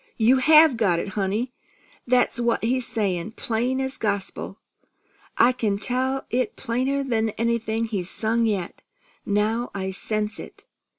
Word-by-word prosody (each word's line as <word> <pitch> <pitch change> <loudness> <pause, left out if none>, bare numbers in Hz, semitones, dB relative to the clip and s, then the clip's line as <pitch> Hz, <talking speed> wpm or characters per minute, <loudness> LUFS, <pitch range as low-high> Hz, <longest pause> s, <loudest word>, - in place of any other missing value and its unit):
You 240 +4 +4
have 305 0 +6
got 195 -7 +2
it, 170 - -3
honey! 210 +6 -2 0.5
That's 245 -1 +2
what 235 -2 0
he's 250 +1 0
saying, 200 -3 -1
plain 245 +5 -1
as 265 0 -3
gospel! 200 -1 -3 0.8
I 245 - +6
can 215 -5 -1
tell 260 +4 0
it 250 -2 0
plainer'n 255 -2 -1
anything 230 -1 0
he's 195 -5 -4
sung 230 +1 0
yet, 195 -5 -3 0.5
now 215 +4 0
I 190 -1 -3
sense 215 +2 -3
it." - - -11
230 Hz, 135 wpm, -24 LUFS, 210-250 Hz, 0.8 s, have